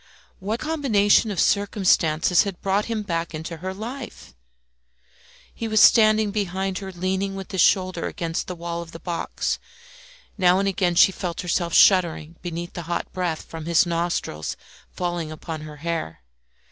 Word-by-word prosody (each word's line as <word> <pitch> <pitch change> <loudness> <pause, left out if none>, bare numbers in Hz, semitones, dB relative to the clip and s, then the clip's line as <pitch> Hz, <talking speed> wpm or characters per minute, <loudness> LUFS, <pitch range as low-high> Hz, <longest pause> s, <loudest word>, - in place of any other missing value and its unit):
What 210 +4 -3
combination 240 -10 +2
of 200 - -3
circumstances 180 -5 +3
had 195 -4 -4
brought 195 +2 +1
him 225 -2 -3
back 170 -3 -3
into 160 +2 -6
her 185 +4 -5
life? 220 - -8 1.2
He 230 - -4
was 215 -1 +2
standing 215 -2 +6
behind 190 -2 -2
her, 195 -1 -7
leaning 190 +2 -2
with 195 -1 -7
his 190 -3 +1
shoulder 185 -2 +2
against 165 -1 -3
the 180 - -5
wall 170 0 -4
of 165 -1 -11
the 165 - -8
box; 170 -1 -3 0.8
now 180 0 +5
and 195 +1 +1
again 180 -2 +1
she 190 - +6
felt 180 -2 -4
herself 175 -1 -1
shuddering 170 -4 +4
beneath 175 0 -5
the 175 - -5
hot 170 - -2
breath 175 -4 -2
from 160 -1 -8
his 170 +1 +4
nostrils 170 - -2 0.3
falling 175 -3 -3
upon 155 0 -6
her 150 -1 -9
hair. 125 - -3
180 Hz, 160 wpm, -23 LUFS, 170-200 Hz, 1.2 s, standing